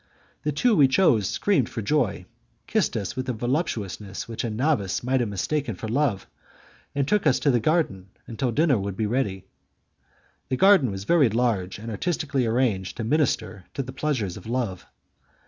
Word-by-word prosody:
The 150 - -1
two 225 - +2
we 145 -6 +6
chose 130 - +3
screamed 185 - +1
for 115 - -5
joy, 130 -2 0 0.4
kissed - - 0
us 100 - -4
with 130 0 -3
a - - 0
voluptuousness 110 - -3
which 115 -1 -4
a 120 - -1
novice 110 -4 0
might 130 +2 +1
have 120 -3 0
mistaken 115 +4 -2
for 110 - -6
love, 115 -4 0 0.7
and 140 -1 0
took 210 -3 +2
us 130 - +4
to 145 - +3
the 120 - +3
garden 110 - 0 0.2
until 120 +2 -2
dinner 145 -2 +3
would 100 -1 -4
be 110 - 0
ready. 105 -5 -1 1.0
That 130 - +1
garden 190 - +5
was 95 -1 -5
very 150 0 +4
large 110 -5 0
and 115 +2 -7
artistically 140 - -1
arranged 110 -6 0
to 115 - -3
minister 110 - 0
to 135 - -1
the 130 +1 -8
pleasures 130 -11 -2
of 95 - -11
love. 115 -7 -3
120 Hz, 180 wpm, -25 LUFS, 105-145 Hz, 1.0 s, we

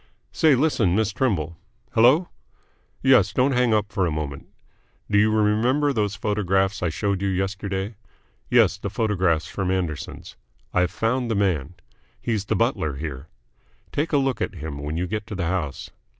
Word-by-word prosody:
Say, 155 -4 +4
listen, 120 - +2
Miss 110 -1 +1
Trimble. 85 - -1 0.3
Hello? 130 +10 +5 0.8
Yes, 125 -8 +5
don't 130 +5 +2
hang 125 -2 +2
up 105 -1 +1
for 95 -4 +1
a - - -1
moment. 75 -2 -5 0.6
Do 105 - +5
you 105 +1 +4
remember 115 +7 +2
those 105 -4 0
photographs 95 -1 0
I 90 - +1
showed 100 +4 -1
you 100 - 0
yesterday? 95 +2 -2 0.6
Yes, - - +4
the - - -4
photographs 95 -7 +1
from 95 -2 -3
Anderson's. 90 -5 -4 0.4
I've 90 0 +2
found 120 +2 -1
the 115 - 0
man. 90 -5 0 0.4
He's 110 -4 -2
the - - 0
butler 115 - 0
here. 70 -1 -6 0.6
Take 150 +3 -1
a 145 - +3
look 135 -2 0
at - - -2
him 75 -3 -6
when 75 +2 -4
you 90 - 0
get 105 +3 -4
to 105 - -6
the 90 -2 -2
house. 80 -5 -3
100 Hz, 165 wpm, -24 LUFS, 90-115 Hz, 0.8 s, Hello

